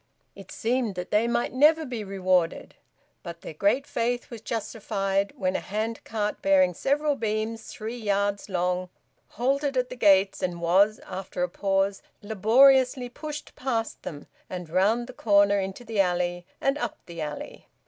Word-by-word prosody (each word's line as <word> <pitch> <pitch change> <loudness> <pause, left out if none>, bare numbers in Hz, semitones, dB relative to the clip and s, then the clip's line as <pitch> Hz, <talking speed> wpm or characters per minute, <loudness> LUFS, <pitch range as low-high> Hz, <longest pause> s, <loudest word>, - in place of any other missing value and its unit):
It 195 -2 -13
seemed 235 -3 -1
that 180 0 -6
they 215 +3 +3
might 235 0 0
never 310 +4 +5
be 245 -5 -4
rewarded, 185 -3 0 0.5
but 170 0 -8
their - - -8
great 205 - +1
faith 245 0 -2
was 230 -3 -8
justified 200 -3 -2
when 185 -1 0
a - - +1
hand 220 +3 -3
cart, 210 -2 -3
bearing 185 -2 +4
several 290 - +1
beams 220 -1 -2
three 225 +3 -6
yards 200 -1 -1
long, 180 0 -1 0.5
halted 275 +2 +1
at 250 0 0
the - - -5
gates 195 -5 +4
and 180 -2 -2
was, 190 +5 +3
after 185 -1 -4
a 180 - 0
pause, 195 +1 0 0.2
laboriously 250 +4 +4
pushed 300 +3 -7
past 235 -4 -2
them 145 -2 -7 0.2
and 180 -3 -6
round 210 +7 +2
the 255 - -10
corner 200 -3 +4
into 195 +5 -5
the 225 -2 -3
alley 175 -1 0
and 275 +2 0
up - - -3
the 170 -2 -7
alley. 150 -1 -6
205 Hz, 160 wpm, -26 LUFS, 185-240 Hz, 0.5 s, never